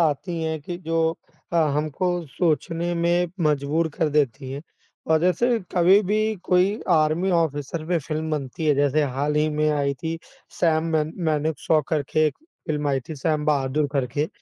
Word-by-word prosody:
आती 165 Hz, +2 st, 0 dB
हैं 160 Hz, -1 st, -2 dB
कि 175 Hz, +4 st, -6 dB
जो 165 Hz, 0 st, 0 dB, 0.6 s
अ, 170 Hz, -, +1 dB, 0.2 s
हमको 155 Hz, +4 st, -1 dB, 0.2 s
सोचने 165 Hz, +2 st, -1 dB
में 175 Hz, +1 st, +2 dB, 0.2 s
मजबूर 150 Hz, +3 st, +1 dB
कर 160 Hz, -4 st, +1 dB
देती 135 Hz, -3 st, 0 dB
हैं 140 Hz, +3 st, -6 dB, 0.4 s
और 160 Hz, 0 st, +3 dB
जैसे 230 Hz, +7 st, +2 dB, 0.2 s
कभी 185 Hz, +3 st, +6 dB
भी 210 Hz, +2 st, 0 dB, 0.3 s
कोई 185 Hz, +2 st, +3 dB, 0.2 s
आर्मी 160 Hz, +3 st, +3 dB
ऑफिसर 155 Hz, -2 st, -1 dB
पे 175 Hz, -1 st, +2 dB
फ़िल्म 155 Hz, +1 st, -4 dB
बनती 150 Hz, +1 st, -3 dB
है 150 Hz, -, +4 dB
जैसे 145 Hz, +2 st, +2 dB
हाल 145 Hz, +2 st, 0 dB
ही 155 Hz, +1 st, +3 dB
में 155 Hz, 0 st, +1 dB
आई 140 Hz, -1 st, 0 dB
थी 165 Hz, 0 st, -2 dB, 0.4 s
सैम 165 Hz, -1 st, +2 dB
मन 155 Hz, +1 st, -1 dB
मानेकशॉ 155 Hz, 0 st, +1 dB
करके 155 Hz, 0 st, +1 dB
एक 150 Hz, -, -3 dB, 0.3 s
फ़िल्म 150 Hz, -3 st, -1 dB
आई 135 Hz, -1 st, +1 dB
थी 160 Hz, -, -5 dB
सैम 150 Hz, +1 st, 0 dB
बहादूर 145 Hz, 0 st, +1 dB
करके। 140 Hz, +2 st, 0 dB
155 Hz, 165 wpm, -24 LUFS, 145-170 Hz, 0.6 s, कभी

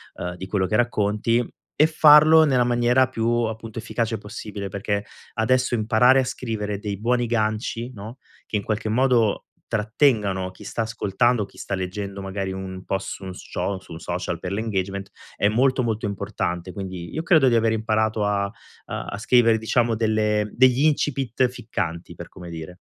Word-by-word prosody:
ehm, 90 Hz, 0 st, -5 dB
di 95 Hz, -, -7 dB
quello 95 Hz, -1 st, 0 dB
che 110 Hz, -, 0 dB
racconti. 115 Hz, 0 st, +1 dB, 0.3 s
E 155 Hz, -, +7 dB
farlo 155 Hz, 0 st, +7 dB
nella 130 Hz, -5 st, +3 dB
maniera 120 Hz, +2 st, +3 dB
più, 115 Hz, -3 st, -3 dB, 0.2 s
appunto, 110 Hz, 0 st, -5 dB
efficace 115 Hz, 0 st, -2 dB
possibile, 105 Hz, 0 st, -7 dB
perché 100 Hz, +1 st, -2 dB, 0.3 s
adesso 125 Hz, +2 st, +2 dB
imparare 120 Hz, +4 st, +4 dB
a 130 Hz, -, +1 dB
scrivere 110 Hz, -5 st, -3 dB
dei 100 Hz, -1 st, -5 dB
buoni 120 Hz, +2 st, +1 dB
ganci, 115 Hz, +1 st, -1 dB
no, 110 Hz, +4 st, -9 dB, 0.3 s
che 105 Hz, -, -2 dB
in 100 Hz, -, -4 dB
qualche 110 Hz, +1 st, -2 dB
modo 120 Hz, -2 st, +2 dB, 0.2 s
trattengano 105 Hz, -4 st, +1 dB
chi 95 Hz, -, -14 dB
sta 115 Hz, -, -3 dB
ascoltando 110 Hz, +1 st, +1 dB
o -, -, -5 dB
chi 95 Hz, -, -20 dB
sta 100 Hz, -, -3 dB
leggendo, 100 Hz, +1 st, -5 dB
magari 95 Hz, 0 st, -4 dB
un 95 Hz, 0 st, -6 dB
po' 95 Hz, -, -1 dB
su 95 Hz, -, -7 dB
un 95 Hz, -1 st, -6 dB
scio 95 Hz, +1 st, -4 dB
su 90 Hz, -, -13 dB
un 80 Hz, -, -8 dB
social 85 Hz, 0 st, -3 dB
per 90 Hz, -, -5 dB
l' 100 Hz, -, -2 dB
engagement, 100 Hz, -2 st, -3 dB, 0.3 s
è 100 Hz, -, +3 dB
molto, 130 Hz, +4 st, +2 dB
molto 115 Hz, -2 st, -1 dB
importante. 95 Hz, -3 st, -3 dB
Quindi 95 Hz, -3 st, -6 dB
io 160 Hz, -, -3 dB
credo 160 Hz, -7 st, +5 dB
di 120 Hz, -, +4 dB
aver 115 Hz, -1 st, +3 dB
imparato 110 Hz, -1 st, 0 dB
a, 100 Hz, -1 st, +1 dB
uhm, -, -, -11 dB, 0.6 s
a 100 Hz, -, -4 dB
scrivere, 115 Hz, 0 st, +4 dB
diciamo, 115 Hz, +1 st, +1 dB
delle 105 Hz, -1 st, +1 dB
degli 130 Hz, +1 st, +4 dB
incipit 135 Hz, -5 st, +1 dB
ficcanti, 90 Hz, -8 st, -5 dB
per -, -, -9 dB
come 90 Hz, -1 st, -11 dB
dire. 85 Hz, +2 st, -8 dB
110 Hz, 180 wpm, -23 LUFS, 100-120 Hz, 0.6 s, E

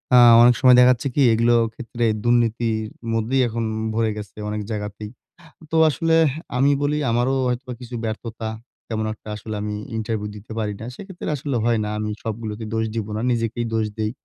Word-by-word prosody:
আ -, -, +8 dB, 0.2 s
অনেক 120 Hz, 0 st, +7 dB
সময় 130 Hz, -1 st, +8 dB
দেখা 125 Hz, 0 st, +7 dB
যাচ্ছে 120 Hz, +3 st, -4 dB
কি? 145 Hz, -, +3 dB
এগুলোও 115 Hz, +1 st, +4 dB
ক্ষেত্রে 120 Hz, -1 st, -3 dB, 0.2 s
দুর্নীতির 115 Hz, -2 st, +1 dB, 0.3 s
মধ্যেই 115 Hz, +4 st, +1 dB
এখন 115 Hz, 0 st, -3 dB, 0.3 s
ভরে 110 Hz, 0 st, +1 dB
গেছে 105 Hz, 0 st, -9 dB
অনেক 105 Hz, 0 st, -3 dB
জায়গাতেই। 105 Hz, 0 st, -5 dB, 0.6 s
তো -, -, -1 dB
আসলে 165 Hz, +4 st, 0 dB
এহ 150 Hz, -, +3 dB, 0.3 s
আমি 140 Hz, +3 st, +4 dB
বলি 145 Hz, +1 st, +1 dB
আমারও 120 Hz, +3 st, +1 dB
হয়তোবা 125 Hz, 0 st, -3 dB
কিছু 120 Hz, 0 st, -7 dB
ব্যর্থতা। 110 Hz, 0 st, -4 dB, 0.4 s
তেমন 110 Hz, -1 st, -2 dB
একটা 110 Hz, -, -13 dB
আসলে 110 Hz, +1 st, -6 dB
আমি 105 Hz, 0 st, -3 dB, 0.2 s
ইন্টারভিউ 110 Hz, -1 st, -2 dB
দিতে 105 Hz, +2 st, -12 dB
পারি 105 Hz, -1 st, -1 dB
না। 110 Hz, -, -7 dB
সেক্ষেত্রে 190 Hz, -5 st, -7 dB
আসলে 140 Hz, 0 st, -3 dB
হয় 115 Hz, -2 st, +2 dB
না। -, -, -3 dB
আমি 105 Hz, 0 st, -2 dB
সবগুলোতে 110 Hz, 0 st, -5 dB
দোষ 110 Hz, 0 st, 0 dB
দিব 110 Hz, -2 st, -2 dB
না, -, -, -2 dB
নিজেকেই 115 Hz, 0 st, -1 dB
দোষ 110 Hz, -1 st, +1 dB
দেই 110 Hz, 0 st, -1 dB
115 Hz, 185 wpm, -22 LUFS, 110-120 Hz, 0.6 s, আ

